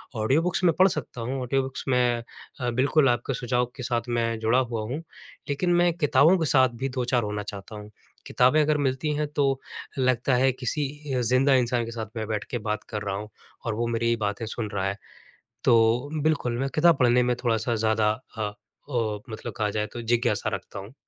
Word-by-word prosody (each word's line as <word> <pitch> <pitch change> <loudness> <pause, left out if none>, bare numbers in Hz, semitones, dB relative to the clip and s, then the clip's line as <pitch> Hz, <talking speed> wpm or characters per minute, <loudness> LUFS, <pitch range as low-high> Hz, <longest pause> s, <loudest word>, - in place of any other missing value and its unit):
Audio 115 +8 +2
books 180 +2 -1
मैं 170 -2 +5
पढ़ 190 - +8
सकता 150 -8 -4
हूँ, 130 +4 -3
ऑडियो 135 +2 +1
बुक्स 130 0 -5
मैं 125 -2 +2 0.4
अ, 125 -2 -1
बिल्कुल 135 +4 +3
आपके 120 +2 0
सुझाव 125 0 0
के 125 - -7
साथ 120 -1 0 0.2
मैं 115 -1 0
जुड़ा 115 +3 +3
हुआ 120 -3 -2
हूँ, 120 +6 -4 0.5
लेकिन 175 +5 +1
मैं 175 0 +4
किताबों 160 +2 +4
के 165 - 0
साथ 130 -3 +4
भी 135 - 0
दो-चार 125 -1 0
होना 105 0 -3
चाहता 100 +1 -8
हूँ। 105 0 -9 0.4
किताबें 130 +5 +4
अगर 150 0 +2
मिलती 130 +4 -1
हैं, 150 0 -1
तो 140 -2 0 0.4
लगता 130 0 +2
है, 130 +2 +4
किसी 130 +3 -2 0.3
अ, 125 - +1
ज़िंदा 130 +4 +3
इंसान 120 -1 +1
के 115 - -7
साथ 115 -1 -4
मैं 110 -1 -3
बैठ 105 -1 -2
के 120 - -1
बात 105 - -2
कर 105 -2 -4
रहा 100 -1 -2
हूँ 105 +2 -6 0.4
और 115 - -1
वो 120 +2 -1
मेरी 115 0 +1
बातें 105 +2 -2
सुन 110 0 -4
रहा 95 -1 -1
है। 100 +1 -3 0.7
तो 115 +3 +3
बिल्कुल, 145 -6 +1
मैं 135 +1 -1
किताब 165 0 +5
पढ़ने 125 0 +4
में 125 0 +1
थोड़ा-सा 115 0 +1
ज़्यादा 110 -1 +2 0.3
अ 105 -2 -2 0.4
अ, 110 -4 -1
मतलब 110 0 -6
कहा 105 -1 0
जाए, 105 +1 -1
तो 120 - -7
जिज्ञासा 120 +1 +1
रखता - - -8
हूँ। 100 +5 -10
120 Hz, 210 wpm, -26 LUFS, 110-135 Hz, 0.7 s, पढ़